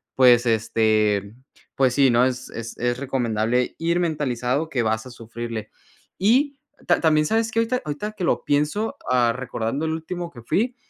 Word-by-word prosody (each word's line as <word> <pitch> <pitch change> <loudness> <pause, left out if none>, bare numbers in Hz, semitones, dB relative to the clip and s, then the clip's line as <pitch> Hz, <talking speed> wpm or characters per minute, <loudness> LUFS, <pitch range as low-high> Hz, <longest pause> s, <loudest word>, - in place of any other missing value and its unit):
Pues, 125 -2 +6
este, 110 -2 +1 0.4
pues 130 -2 +3
sí, 140 -2 +5
¿no?, 120 +1 +4
es 130 0 -3
es 115 0 -7
es 120 0 -1
recomendable 125 -2 0
ir 170 +1 0
mentalizado 145 -3 -1
que 125 -6 0
vas 110 +2 -1
a 130 - -10
sufrirle. 115 -1 -6 0.5
Y 265 +8 +2 0.3
ta 175 - +3
también, 155 -2 +3
¿sabes 225 +5 +1
que?, 225 - 0
ahorita 235 +2 0
ahorita 150 +9 -4
que 205 -4 -6
lo - - 0
pienso, 150 +10 0 0.2
ah, 120 -2 +3
recordando 130 +3 -3
el 160 - -1
último 170 +2 -5
que 120 - -12
fui. 230 - 0
130 Hz, 170 wpm, -23 LUFS, 115-165 Hz, 0.5 s, Pues